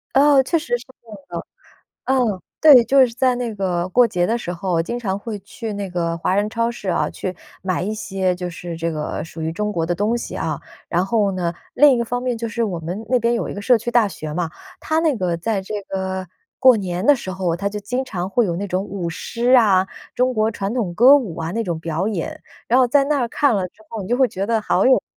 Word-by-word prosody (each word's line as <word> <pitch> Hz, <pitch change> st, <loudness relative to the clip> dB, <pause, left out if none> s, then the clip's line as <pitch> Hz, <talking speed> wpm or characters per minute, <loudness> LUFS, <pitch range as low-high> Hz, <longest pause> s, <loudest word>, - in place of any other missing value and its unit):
哦， 280 Hz, 0 st, +6 dB
确 325 Hz, +5 st, +1 dB
实 245 Hz, -6 st, -1 dB
是 240 Hz, -, -14 dB, 0.2 s
会 225 Hz, -2 st, -12 dB
的。 -, -, -5 dB, 0.6 s
嗯， 245 Hz, -7 st, +1 dB, 0.2 s
对， 275 Hz, -7 st, +8 dB
就 270 Hz, +1 st, +5 dB
是 230 Hz, -, -8 dB
在 255 Hz, 0 st, +2 dB
那 240 Hz, -3 st, -3 dB
个 185 Hz, -3 st, -1 dB
过 245 Hz, +6 st, +5 dB
节 175 Hz, -5 st, 0 dB
的 230 Hz, +4 st, +1 dB
时 175 Hz, -7 st, -4 dB
候， 175 Hz, -1 st, -1 dB
经 240 Hz, +8 st, -4 dB
常 195 Hz, -4 st, -2 dB
会 215 Hz, 0 st, -6 dB
去 215 Hz, +3 st, -7 dB
那 200 Hz, -1 st, -4 dB
个 170 Hz, -2 st, -2 dB
华 185 Hz, +2 st, 0 dB
人 205 Hz, +1 st, +1 dB
超 230 Hz, 0 st, 0 dB
市 205 Hz, -5 st, -4 dB
啊， -, -, +1 dB
去 185 Hz, -1 st, -5 dB, 0.3 s
买 185 Hz, -2 st, -1 dB
一 210 Hz, +4 st, -2 dB
些 190 Hz, -3 st, -1 dB
就 180 Hz, 0 st, -5 dB
是 170 Hz, 0 st, -7 dB
这 165 Hz, 0 st, -2 dB
个 150 Hz, 0 st, -4 dB
属 165 Hz, 0 st, -10 dB
于 160 Hz, 0 st, -1 dB
中 210 Hz, +5 st, -2 dB
国 165 Hz, -3 st, -1 dB
的 175 Hz, -, 0 dB
东 210 Hz, +6 st, 0 dB
西 235 Hz, -, -5 dB
哦。 -, -, -2 dB, 0.3 s
然 175 Hz, +2 st, +1 dB
后 205 Hz, -2 st, +1 dB
呢， 175 Hz, -2 st, -2 dB, 0.2 s
另 295 Hz, +2 st, +6 dB
一 245 Hz, -, +2 dB
个 235 Hz, -, 0 dB
方 245 Hz, +2 st, -3 dB
面 250 Hz, -2 st, -1 dB
就 230 Hz, 0 st, -4 dB
是 230 Hz, +1 st, -2 dB
我 185 Hz, -6 st, -3 dB
们 180 Hz, +7 st, -5 dB
那 250 Hz, +1 st, +3 dB
边 235 Hz, 0 st, +1 dB
有 235 Hz, -, -1 dB
一 -, -, -5 dB
个 200 Hz, -, -6 dB
社 245 Hz, +1 st, +4 dB
区 235 Hz, +2 st, -4 dB
大 240 Hz, -2 st, +4 dB
学 155 Hz, -6 st, -6 dB
嘛， 170 Hz, -2 st, -1 dB, 0.3 s
它 315 Hz, +1 st, 0 dB
那 315 Hz, -5 st, +2 dB
个 180 Hz, -5 st, -1 dB
在 200 Hz, +2 st, -1 dB
这 210 Hz, +2 st, -4 dB
个 190 Hz, -1 st, -3 dB, 0.3 s
过 255 Hz, -2 st, +7 dB
年 185 Hz, -2 st, -3 dB
的 290 Hz, -, +6 dB
时 190 Hz, -, -6 dB
候， 185 Hz, -3 st, -1 dB
它 200 Hz, +3 st, -4 dB
就 210 Hz, 0 st, -5 dB
经 250 Hz, +6 st, -2 dB
常 185 Hz, -7 st, -4 dB
会 235 Hz, +5 st, +2 dB
有 175 Hz, -4 st, -1 dB
那 200 Hz, +3 st, -4 dB
种 185 Hz, +1 st, -1 dB
舞 185 Hz, -4 st, -4 dB
狮 240 Hz, +9 st, +1 dB
啊、 195 Hz, -6 st, +4 dB, 0.3 s
中 255 Hz, 0 st, +1 dB
国 215 Hz, 0 st, +2 dB
传 205 Hz, +1 st, -3 dB
统 215 Hz, -8 st, -1 dB
歌 255 Hz, +9 st, +8 dB
舞 210 Hz, -, -3 dB
啊 165 Hz, 0 st, -3 dB
那 230 Hz, +2 st, -1 dB
种 170 Hz, -4 st, -3 dB
表 165 Hz, +3 st, -2 dB
演。 195 Hz, -7 st, -4 dB, 0.3 s
然 245 Hz, -, +4 dB
后 255 Hz, -, +5 dB
在 275 Hz, +3 st, +3 dB
那 285 Hz, 0 st, +1 dB
儿 240 Hz, -, 0 dB
看 265 Hz, -1 st, +2 dB
了 190 Hz, -2 st, -1 dB
之 215 Hz, -, -23 dB
后， 220 Hz, -3 st, -5 dB
你 185 Hz, -, -8 dB
就 245 Hz, -, +2 dB
会 260 Hz, -2 st, +4 dB
觉 195 Hz, -2 st, -3 dB
得 225 Hz, 0 st, +1 dB
好 -, -, +1 dB
有， 260 Hz, -, +5 dB
210 Hz, 275 characters per minute, -21 LUFS, 180-240 Hz, 0.6 s, 对